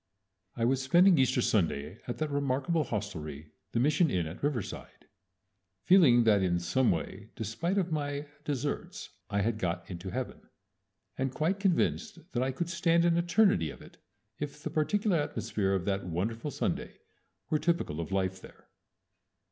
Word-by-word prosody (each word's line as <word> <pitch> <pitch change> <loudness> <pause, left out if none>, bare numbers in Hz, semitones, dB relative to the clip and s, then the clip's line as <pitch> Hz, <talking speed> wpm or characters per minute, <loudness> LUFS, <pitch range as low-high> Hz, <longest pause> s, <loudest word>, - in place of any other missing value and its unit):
I 115 - 0
was 130 +2 +2
spending 175 +5 +5
Easter 130 -2 +3
Sunday 80 -3 0
at 120 - -3
that 155 -1 -2
remarkable 140 +3 0
hostelry, 80 -8 -5 0.2
the 115 - 0
Mission 150 +5 +3
Inn 90 -8 0
at 80 +3 -8
Riverside, 140 -8 -4 0.8
feeling 145 -11 +6
that 105 -3 +4
in 90 -2 +2
some 115 +9 +1
way 95 +5 -3
despite 115 - -2
of 180 -3 0
my 145 -1 -2 0.2
desserts 145 0 -3 0.2
I 100 0 0
had 110 +1 0
got 85 -2 -2
into 90 +2 -6
heaven, 125 +5 -5 0.7
and 135 0 0
quite 165 +8 0
convinced 200 +2 +1
that 120 - -1
I 130 +1 +1
could 170 +6 -3
stand 170 -1 +3
an 170 -1 +4
eternity 170 - +3
of - - -10
it - - -16 0.4
if 150 0 -6
the - - -3
particular 195 +4 +1
atmosphere 105 -9 -1
of 95 -2 -2
that 100 -1 -1
wonderful 110 - -2
Sunday - - -3 0.5
were 155 - +3
typical 170 - 0
of 80 - -6
life 95 -1 -1
there. - - -16
130 Hz, 160 wpm, -30 LUFS, 95-155 Hz, 0.8 s, feeling